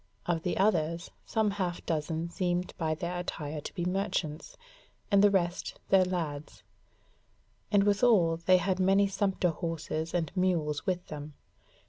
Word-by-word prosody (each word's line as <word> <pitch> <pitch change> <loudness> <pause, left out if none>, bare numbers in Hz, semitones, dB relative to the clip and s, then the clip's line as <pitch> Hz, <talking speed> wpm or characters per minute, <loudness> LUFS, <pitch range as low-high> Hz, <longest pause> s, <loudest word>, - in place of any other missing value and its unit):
Of 170 -2 0
the 180 - -2
others, 170 -4 +1 0.2
some 220 -2 +1
half 185 -3 -3
dozen 160 +1 -2
seemed 180 -1 -1
by 160 -2 0
their 175 +2 -3
attire 150 -3 -4
to - - -7
be 175 - -2
merchants, 180 -4 -2 0.5
and 200 0 +5
the 205 - +7
rest 175 -3 -1
their 190 -1 +5
lads; 160 -5 -4 1.1
and 205 -1 +5
withal 200 -5 +4
they 185 +2 +4
had 185 +1 0
many 195 +2 +4
sumpter 195 -2 0
horses 165 0 -3
and 165 -4 0
mules 170 -4 0
with 180 -1 -1
them. 150 -1 -7
175 Hz, 145 wpm, -30 LUFS, 160-190 Hz, 1.1 s, the